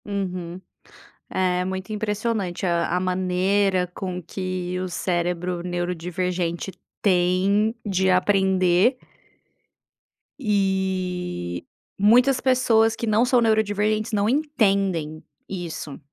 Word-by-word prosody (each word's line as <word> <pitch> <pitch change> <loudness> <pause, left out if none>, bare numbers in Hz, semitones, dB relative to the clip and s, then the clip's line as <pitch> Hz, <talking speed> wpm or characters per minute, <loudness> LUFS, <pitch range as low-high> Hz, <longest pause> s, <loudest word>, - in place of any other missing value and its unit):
Uhum. 185 -3 -4 0.7
É 180 -1 +1
muito 190 +2 -4
impressionante 210 -3 -2
a 170 0 +1
a - - 0
maneira 185 +1 +1
com 180 -1 -4
que 185 0 -4
o 185 - -3
cérebro 175 0 -2
neurodivergente 175 0 -2 0.3
tem 195 +3 +2
de 190 -1 +2
aprender 190 +3 +3 1.4
e 185 - -1 0.3
muitas 245 +6 +5
pessoas 230 -4 +3
que 230 - -4
não 220 +3 +3
são 250 -1 +3
neurodivergentes 215 0 +1
não 205 -1 +1
entendem 195 - 0 0.3
isso, 170 -6 -6
190 Hz, 95 wpm, -23 LUFS, 180-210 Hz, 1.4 s, muitas